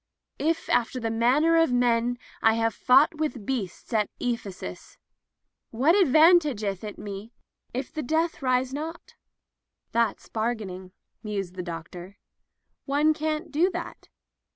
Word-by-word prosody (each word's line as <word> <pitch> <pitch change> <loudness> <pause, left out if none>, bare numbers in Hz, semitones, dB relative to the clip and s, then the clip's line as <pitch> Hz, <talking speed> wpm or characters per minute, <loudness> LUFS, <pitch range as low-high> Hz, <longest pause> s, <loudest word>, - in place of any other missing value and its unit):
'* - - -61
If 330 +2 0
after 245 +1 +1
the 225 -2 -2
manner 270 +9 +3
of 330 -5 +4
men 245 0 +2 0.2
I 225 0 +4
have 225 -1 +1
fought 275 +5 +4
with 295 -9 -2
beasts 230 -5 -4
at 215 -2 +2
Ephesus, 200 - -5 0.7
what 270 +9 +3
advantageth 300 - +4
it 210 -1 -6
me 205 +3 -8 0.4
if 255 +1 -5
the 310 - -3
dead 320 +5 0
rise 255 0 +1
not 320 +4 -6 0.4
?" - - -58
"That's 235 0 0
bargaining," 210 -5 -3 0.3
mused 200 -4 -4
the 185 - -5
doctor. 175 +2 -8 0.7
"One 295 +2 +3
can't 310 +1 -3
do 330 +6 +3
that. 350 - -7
245 Hz, 135 wpm, -26 LUFS, 210-305 Hz, 0.7 s, of